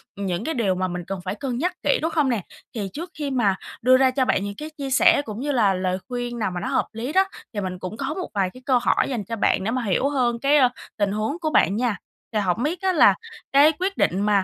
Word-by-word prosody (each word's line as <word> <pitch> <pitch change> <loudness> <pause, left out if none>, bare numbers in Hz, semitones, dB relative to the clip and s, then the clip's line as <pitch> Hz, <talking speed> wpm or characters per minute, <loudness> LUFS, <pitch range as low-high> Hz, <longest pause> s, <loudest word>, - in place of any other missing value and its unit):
ừm, 200 - -4
những 180 -2 -2
cái 320 - -2
điều 205 -7 +1
mà 185 0 -1
mình 175 -1 -5
cần 195 -2 -4
phải 185 +2 -4
cân 245 +1 -3
nhắc 355 +6 0
kỹ, 285 - +2
đúng 325 +1 -1
không 300 -4 +2
nè? 235 -5 0 0.3
Thì 200 -4 -3
trước 335 +3 -6
khi 285 -2 -3
mà 210 -7 +2 0.3
đưa 255 +2 +6
ra 260 -1 +4
cho 260 0 +1
bạn 200 - +1
những 200 0 -5
cái 305 +1 -6
chia 275 -1 -4
sẻ 340 +3 +5
cũng 215 0 -6
như 290 +2 -1
là 215 -7 +3
lời 185 0 -1
khuyên 245 -1 -4
nào 210 -3 -1
mà 180 - -4
nó - - -4
hợp - - 0
lý 240 +6 -4
đó, 380 +1 +5 0.3
thì 205 - -2
mình 185 -1 -4
cũng 185 +5 -6
có 275 +3 -2
một 370 +1 -5
vài 195 -2 +1
cái 255 - -13
câu 255 -3 +3
hỏi 245 - +1
dành 235 -6 -2
cho 230 +4 -4
bạn 205 -3 +1
để 225 - -1
mà 255 -1 -1
hiểu 230 +7 +1
hơn 245 -4 0
cái, 280 +3 +4
ơ, 255 -3 +5 0.3
tình 205 -2 +1
huống 220 +11 -2
của 315 -2 -1
bạn 200 - +3
nha. 235 -2 0 0.4
Thì 215 - +2
hổng 195 +3 0
biết 325 +5 -2
á, 380 -1 +2
là 315 - +6 0.4
cái 285 +3 +6
quyết 385 +2 -1
định 190 +3 +1
mà, 205 -2 +3
240 Hz, 285 wpm, -23 LUFS, 200-280 Hz, 0.4 s, đưa